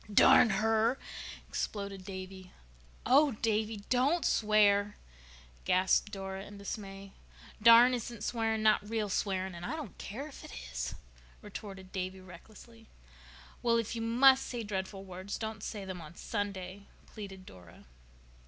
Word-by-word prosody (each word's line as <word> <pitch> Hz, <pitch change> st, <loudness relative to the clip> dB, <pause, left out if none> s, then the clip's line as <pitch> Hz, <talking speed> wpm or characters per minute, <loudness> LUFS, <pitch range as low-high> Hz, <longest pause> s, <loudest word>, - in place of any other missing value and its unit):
"Darn 215 Hz, +3 st, +7 dB
her," 220 Hz, +4 st, +2 dB, 0.5 s
exploded 200 Hz, -2 st, -4 dB
Davy. 190 Hz, -1 st, -8 dB, 0.5 s
"Oh, 280 Hz, +2 st, +5 dB
Davy, 215 Hz, -1 st, -1 dB
don't 275 Hz, +7 st, +2 dB
swear," 210 Hz, -1 st, +3 dB, 0.7 s
gasped 185 Hz, +3 st, +2 dB
Dora 195 Hz, -1 st, -5 dB
in 205 Hz, 0 st, -11 dB
dismay. 195 Hz, -1 st, -7 dB, 0.5 s
"'Darn' 235 Hz, +2 st, +8 dB
isn't 235 Hz, -2 st, -4 dB
swearing—not 220 Hz, -2 st, +1 dB
real 220 Hz, -2 st, -1 dB
swearing. 190 Hz, -1 st, -1 dB
And 170 Hz, 0 st, -9 dB
I 300 Hz, -, -3 dB
don't 295 Hz, -, -7 dB
care 265 Hz, +9 st, -6 dB
if 295 Hz, -, -12 dB
it -, -, -10 dB, 0.2 s
is," -, -, -3 dB, 0.5 s
retorted 195 Hz, -2 st, -9 dB
Davy 185 Hz, 0 st, -4 dB
recklessly. 215 Hz, +5 st, -14 dB, 0.7 s
"Well, 235 Hz, -1 st, +3 dB
if 230 Hz, 0 st, -2 dB
you 230 Hz, -, -3 dB
must 260 Hz, +4 st, +5 dB
say 240 Hz, -2 st, -4 dB
dreadful 195 Hz, -1 st, -4 dB
words 185 Hz, +2 st, -6 dB
don't 220 Hz, -2 st, -5 dB
say 205 Hz, -2 st, -5 dB
them 185 Hz, -2 st, -6 dB
on 155 Hz, +1 st, -11 dB
Sunday," 200 Hz, -2 st, -4 dB, 0.2 s
pleaded 195 Hz, -3 st, -9 dB
Dora. 90 Hz, -, -15 dB
205 Hz, 135 wpm, -32 LUFS, 190-225 Hz, 0.7 s, Darn